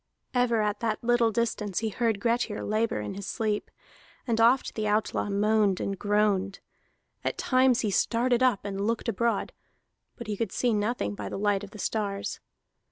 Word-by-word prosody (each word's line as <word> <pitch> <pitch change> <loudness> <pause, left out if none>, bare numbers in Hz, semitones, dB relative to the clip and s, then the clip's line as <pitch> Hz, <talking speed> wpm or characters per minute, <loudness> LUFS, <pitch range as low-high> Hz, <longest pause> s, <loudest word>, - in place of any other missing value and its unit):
Ever 240 -3 +2
at 210 0 -1
that 225 -1 -2
little 240 -1 +3
distance 215 -3 -1
he 225 - 0
heard 225 -1 0
Grettir 230 -1 0
labor 215 - 0
in 105 - -5
his 200 0 -7
sleep, 215 -2 -2 0.6
and 230 -2 +1
oft 245 +4 +4
the 215 -1 -2
outlaw 210 0 0
moaned 205 -1 +2
and 195 -2 -3
groaned. 205 -2 +1 0.6
At - - -2
times 255 -1 +3
he 215 - 0
started 240 +4 +2
up 250 -7 +2
and 200 0 -2
looked 230 +1 -1
abroad, 230 +2 0 0.6
but 235 - -8
he 215 -1 -3
could 210 -1 -2
see 245 -2 +1
nothing 210 - -1
by 100 -1 -6
the - - -4
light 205 0 +1
of 200 - -8
the 210 - -12
stars. 200 -1 -2
215 Hz, 175 wpm, -27 LUFS, 200-235 Hz, 0.6 s, oft